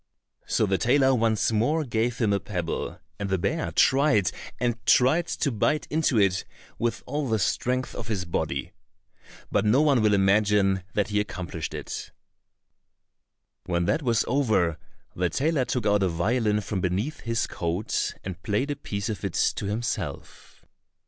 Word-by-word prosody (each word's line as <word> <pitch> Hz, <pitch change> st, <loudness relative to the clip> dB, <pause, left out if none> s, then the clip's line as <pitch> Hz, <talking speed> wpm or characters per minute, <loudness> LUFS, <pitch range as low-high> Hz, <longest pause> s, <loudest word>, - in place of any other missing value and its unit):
So -, -, +2 dB
the 95 Hz, -2 st, 0 dB
tailor 135 Hz, +2 st, +4 dB
once 115 Hz, -2 st, +2 dB
more 145 Hz, +9 st, +1 dB
gave 115 Hz, -1 st, -1 dB
him 110 Hz, -4 st, +2 dB
a 100 Hz, -, +1 dB
pebble, 90 Hz, -3 st, -4 dB, 0.2 s
and 100 Hz, -1 st, -3 dB
the 95 Hz, -, +1 dB
bear 150 Hz, -, -1 dB
tried 135 Hz, -, +3 dB, 0.3 s
and 120 Hz, -1 st, -1 dB
tried 155 Hz, +7 st, +4 dB
to 140 Hz, -, -1 dB
bite 145 Hz, +7 st, +1 dB
into 150 Hz, -5 st, +2 dB
it 95 Hz, -2 st, +2 dB, 0.4 s
with 120 Hz, 0 st, -1 dB
all 145 Hz, -3 st, -2 dB
the 110 Hz, -, +2 dB
strength 125 Hz, +5 st, -1 dB
of 115 Hz, -, -7 dB
his 100 Hz, -5 st, -2 dB
body. 80 Hz, -5 st, -2 dB, 0.8 s
But -, -, +2 dB
no 110 Hz, +5 st, +4 dB
one 140 Hz, -6 st, +4 dB
will 105 Hz, -1 st, +4 dB
imagine 100 Hz, -1 st, +3 dB
that 105 Hz, 0 st, +1 dB
he 105 Hz, 0 st, +1 dB
accomplished 90 Hz, -6 st, -4 dB
it. -, -, -6 dB, 1.6 s
When 85 Hz, -1 st, 0 dB
that 105 Hz, -, +1 dB
was 120 Hz, -5 st, +1 dB
over, 105 Hz, -, +1 dB, 0.4 s
the 90 Hz, 0 st, 0 dB
tailor 140 Hz, -, +1 dB
took 125 Hz, -2 st, -2 dB
out 105 Hz, -1 st, +3 dB
a 95 Hz, -, +2 dB
violin 105 Hz, +5 st, +1 dB
from 100 Hz, -2 st, -3 dB
beneath 100 Hz, -, -1 dB
his 115 Hz, -1 st, -1 dB
coat, 85 Hz, +6 st, -2 dB
and 95 Hz, -1 st, -6 dB
played 110 Hz, +9 st, -1 dB
a -, -, -2 dB
piece 100 Hz, -7 st, -4 dB
of 110 Hz, -3 st, -4 dB
it 100 Hz, -3 st, -3 dB, 0.2 s
to 100 Hz, -, -3 dB
himself. 110 Hz, +4 st, -5 dB
110 Hz, 160 wpm, -26 LUFS, 95-125 Hz, 1.6 s, tailor